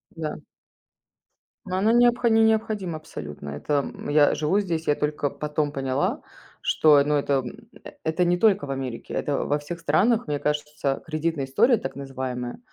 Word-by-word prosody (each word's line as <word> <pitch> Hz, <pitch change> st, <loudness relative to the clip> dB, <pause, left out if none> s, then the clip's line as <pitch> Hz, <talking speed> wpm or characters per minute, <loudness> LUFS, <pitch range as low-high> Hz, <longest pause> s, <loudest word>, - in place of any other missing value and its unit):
Да. 155 Hz, -2 st, -4 dB, 1.3 s
Но 185 Hz, 0 st, -2 dB
она 215 Hz, +4 st, +3 dB
необхо 240 Hz, 0 st, +4 dB
не 225 Hz, 0 st, +4 dB
необходима 215 Hz, -6 st, 0 dB
абсолютно. 75 Hz, -, -8 dB
Это, 75 Hz, -, -4 dB, 0.2 s
м -, -, -7 dB
Я 145 Hz, 0 st, +5 dB
живу 155 Hz, +7 st, +1 dB
здесь, 165 Hz, -5 st, -2 dB
я 145 Hz, -, +3 dB
только 150 Hz, -1 st, -1 dB
потом 150 Hz, -1 st, -2 dB
поняла, 135 Hz, -1 st, -1 dB, 0.4 s
что, 150 Hz, -2 st, +5 dB
ну, 150 Hz, 0 st, +1 dB
это 140 Hz, -2 st, +1 dB, 0.6 s
это 160 Hz, +3 st, +1 dB
не 175 Hz, 0 st, +2 dB
только 200 Hz, -5 st, +3 dB
в 135 Hz, -, -5 dB
Америке, 130 Hz, -3 st, -5 dB
это 145 Hz, -, -1 dB
во 145 Hz, -, +1 dB
всех 170 Hz, +3 st, -7 dB
странах, 215 Hz, +8 st, +2 dB
мне 145 Hz, -1 st, -1 dB
кажется, 150 Hz, -2 st, -2 dB
кредитная 155 Hz, -2 st, -2 dB
история 230 Hz, -, +3 dB
так 135 Hz, -, -6 dB
называемая 130 Hz, -, -5 dB
150 Hz, 160 wpm, -25 LUFS, 140-185 Hz, 1.3 s, Я